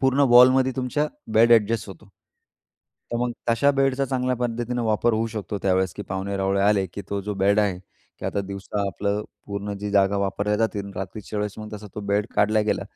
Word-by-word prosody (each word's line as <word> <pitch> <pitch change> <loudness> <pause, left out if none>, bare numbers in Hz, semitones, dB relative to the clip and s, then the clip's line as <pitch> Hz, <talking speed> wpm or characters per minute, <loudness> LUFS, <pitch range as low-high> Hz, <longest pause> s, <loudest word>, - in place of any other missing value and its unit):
पूर्ण 135 +1 +2
वॉलमध्ये 130 +2 +6
तुमचा 130 +4 0 0.3
bed 115 +2 +6
adjust 115 -1 +3
होतो. 100 +2 -12 1.1
तर - - 0
मग 120 0 -1 0.2
तशा 115 +5 +4
बेडचा 135 -1 +1
चांगल्या 130 -1 -1
पद्धतीनं 120 0 -2
वापर 110 +1 +1
होऊ 110 +1 0
शकतो 105 -2 -4
त्यावेळेस, 95 -1 +1
की 105 - -6
पाहुणे-रावळे 95 +1 -1
आले, 100 -2 +3
की 95 +3 -8
तो 100 - -1
जो 105 +1 -4
बेड 100 +2 +4
आहे, 95 -4 0 0.4
की - - -10
आता 100 - -1
दिवसा 100 +1 -5
आपलं 100 +2 -2 0.2
पूर्ण 100 0 -4
जी 105 0 -4
जागा 100 0 +3
वापरल्या 100 +2 0
जाते 110 -1 0
आणि 100 0 -8
रात्रीच्या 100 +2 -5
वेळेस 105 -1 -2
मग 110 0 -8
तसा 105 0 -9
तो 105 - -4
बेड 105 +1 +1
काढला 110 +1 +3
गेला, - - 0
105 Hz, 195 wpm, -24 LUFS, 100-120 Hz, 1.1 s, वॉलमध्ये